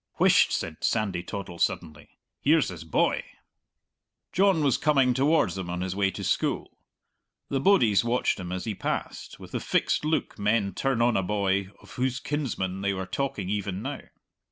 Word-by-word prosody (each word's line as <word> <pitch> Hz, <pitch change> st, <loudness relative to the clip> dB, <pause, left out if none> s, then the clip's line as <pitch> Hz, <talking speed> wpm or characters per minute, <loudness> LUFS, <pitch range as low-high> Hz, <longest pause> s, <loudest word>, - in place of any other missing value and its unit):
"Whisht!" -, -, +5 dB
said 80 Hz, -, -3 dB
Sandy 100 Hz, -6 st, 0 dB
Toddle 90 Hz, -1 st, -7 dB
suddenly; 80 Hz, -3 st, -2 dB, 0.3 s
"here's 150 Hz, -2 st, +3 dB
his 90 Hz, -3 st, -8 dB
boy!" 80 Hz, -, +1 dB, 1.1 s
John 190 Hz, -4 st, +3 dB
was 140 Hz, -3 st, +2 dB
coming 135 Hz, -5 st, +3 dB
towards 135 Hz, -, +2 dB
them 95 Hz, -2 st, -5 dB
on 90 Hz, 0 st, -3 dB
his 95 Hz, 0 st, -3 dB
way 100 Hz, -1 st, +2 dB
to -, -, -7 dB
school. -, -, -1 dB, 0.7 s
The 135 Hz, -, 0 dB
bodies 130 Hz, -, +4 dB
watched 120 Hz, -2 st, 0 dB
him 90 Hz, -1 st, -6 dB
as 90 Hz, 0 st, -3 dB
he 110 Hz, -, -2 dB
passed, -, -, -4 dB
with -, -, -11 dB
the -, -, -2 dB
fixed -, -, 0 dB
look 155 Hz, -7 st, -1 dB
men 105 Hz, -1 st, +1 dB
turn 135 Hz, -4 st, 0 dB
on 120 Hz, -1 st, +3 dB
a -, -, +3 dB
boy 100 Hz, 0 st, 0 dB
of -, -, -15 dB
whose 130 Hz, 0 st, -1 dB
kinsmen 100 Hz, -11 st, -3 dB
they 100 Hz, 0 st, 0 dB
were 95 Hz, 0 st, -3 dB
talking 110 Hz, -4 st, -3 dB
even 100 Hz, -1 st, -2 dB
now. 140 Hz, +1 st, -4 dB
105 Hz, 175 wpm, -27 LUFS, 95-135 Hz, 1.1 s, Whisht